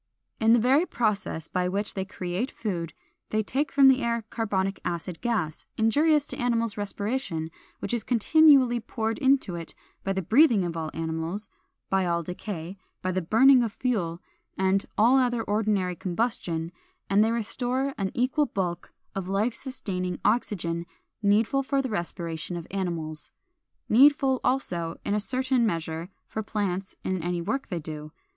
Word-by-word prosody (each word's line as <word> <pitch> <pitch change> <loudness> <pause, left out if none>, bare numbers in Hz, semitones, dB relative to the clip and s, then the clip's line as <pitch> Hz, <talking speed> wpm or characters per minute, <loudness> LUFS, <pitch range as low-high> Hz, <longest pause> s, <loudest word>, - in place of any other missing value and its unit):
_ - - 0
In 225 +1 +6
the 240 - +6
very 270 +9 +3
process 200 -8 -1
by 180 0 0
which 200 +3 -1
they 190 -1 -3
create 190 +5 -3
food 170 - -4 0.4
they 215 0 +1
take 280 +7 -1
from 275 -1 +6
the 265 0 +5
air 235 -1 0
carbonic 195 -4 -1
acid 170 0 -4
gas, 205 -11 -2
injurious 290 +7 +3
to - - -7
animal 235 -1 +1
respiration, 205 -5 -3 0.3
which - - -4
is 235 -3 -1
continually 260 0 +5
poured 225 +1 -3
into 270 - +3
it 170 -1 -6 0.3
by 195 - -1
the 190 -1 -1
breathing 225 - +5
of 170 -1 -3
all 160 -1 -3
animals, 165 +5 -3 0.4
by 190 -1 +2
all 170 0 0
decay, 180 +1 -6 0.2
by 185 - 0
the 185 +1 0
burning 250 +9 +6
of 225 -3 -1
fuel 190 -11 -1 0.4
and 190 +1 +1
all 240 +5 +5
other 245 -3 +1
ordinary 205 -4 0
combustion; 175 -4 -2 0.4
and 200 +2 +4
they 220 - +2
restore 245 +4 -1
an 195 -1 0
equal 260 +4 +2
bulk 175 -3 -3 0.2
of 195 -2 -4
life 210 +5 +1
sustaining 185 -10 -4
oxygen 175 -6 0 0.3
needful 220 +6 +3
for 275 +1 0
the 265 -1 -1
respiration 170 -3 -4
of 170 - -6
animals, 170 -5 -3 0.6
needful, 270 +2 +5
also, 175 -11 -1
in - - 0
a 210 - +2
certain 255 +2 +1
measure, 165 -4 -2 0.2
for 220 - -4
plants 195 -3 -3
in 185 -2 -1
any 175 +1 -1
work 270 +11 -2
they 175 - -3
do. 155 -1 -7
205 Hz, 160 wpm, -27 LUFS, 175-245 Hz, 0.6 s, In